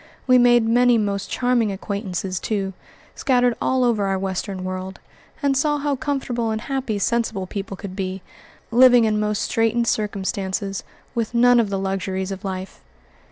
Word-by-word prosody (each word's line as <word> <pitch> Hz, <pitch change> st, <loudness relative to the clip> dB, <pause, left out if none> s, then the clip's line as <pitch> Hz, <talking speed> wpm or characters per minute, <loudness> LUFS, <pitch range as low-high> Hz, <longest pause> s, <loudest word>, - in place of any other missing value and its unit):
We 255 Hz, -1 st, +5 dB
made 240 Hz, -2 st, +5 dB
many 245 Hz, +1 st, +4 dB
most 200 Hz, -2 st, -2 dB
charming 245 Hz, -4 st, +1 dB
acquaintances, 195 Hz, -2 st, -3 dB
too, 195 Hz, -3 st, -2 dB, 0.4 s
scattered 245 Hz, -2 st, +2 dB
all 260 Hz, -1 st, +2 dB
over 220 Hz, -5 st, +2 dB
our 195 Hz, 0 st, 0 dB
Western 190 Hz, 0 st, -3 dB
World, 185 Hz, 0 st, -5 dB, 0.4 s
and 280 Hz, -1 st, +2 dB
saw 295 Hz, +2 st, +2 dB
how 290 Hz, -1 st, -1 dB
comfortable 250 Hz, -4 st, -2 dB
and 220 Hz, 0 st, -1 dB
happy 255 Hz, -4 st, -2 dB
sensible 225 Hz, -2 st, 0 dB
people 195 Hz, 0 st, -6 dB
could 190 Hz, -1 st, -7 dB
be, 190 Hz, -1 st, -4 dB, 0.5 s
living 245 Hz, 0 st, +7 dB
in 215 Hz, -1 st, +1 dB
most 210 Hz, -1 st, 0 dB
straitened 225 Hz, +1 st, +1 dB
circumstances, 195 Hz, -2 st, -2 dB, 0.3 s
with 235 Hz, -1 st, -2 dB
none 245 Hz, +1 st, +6 dB
of 220 Hz, -3 st, +1 dB
the 195 Hz, -, -1 dB
luxuries 190 Hz, 0 st, -2 dB
of 195 Hz, +1 st, -6 dB
life. 190 Hz, -1 st, -6 dB
215 Hz, 160 wpm, -22 LUFS, 195-245 Hz, 0.5 s, living